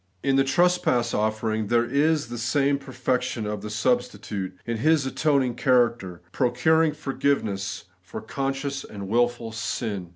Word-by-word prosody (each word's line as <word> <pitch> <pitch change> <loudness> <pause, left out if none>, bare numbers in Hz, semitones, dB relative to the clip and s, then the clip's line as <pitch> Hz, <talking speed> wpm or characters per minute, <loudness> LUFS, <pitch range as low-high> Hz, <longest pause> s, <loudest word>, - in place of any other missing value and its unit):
In 135 -1 +2
the 135 - +4
trespass 135 -6 +2
offering 110 0 -1
there 120 +2 +2
is 145 +2 +1
the 120 -1 -5
same 140 +4 +1
perfec 130 -2 -1
tion 120 -3 -4
of 105 -1 -3
the 105 - -6
substitute, 105 -4 -2
in 115 -1 -2
His 155 +3 +3
atoning 135 -2 +1
character, 120 -8 +1
pro 125 +3 +1
curing 160 +5 +3
forgiveness 135 -9 -2 0.2
for 90 - -8
conscious 135 +3 -3
and 100 -2 -8
wilful 120 +1 0
sin. 105 -4 -3
120 Hz, 150 wpm, -25 LUFS, 110-140 Hz, 0.2 s, the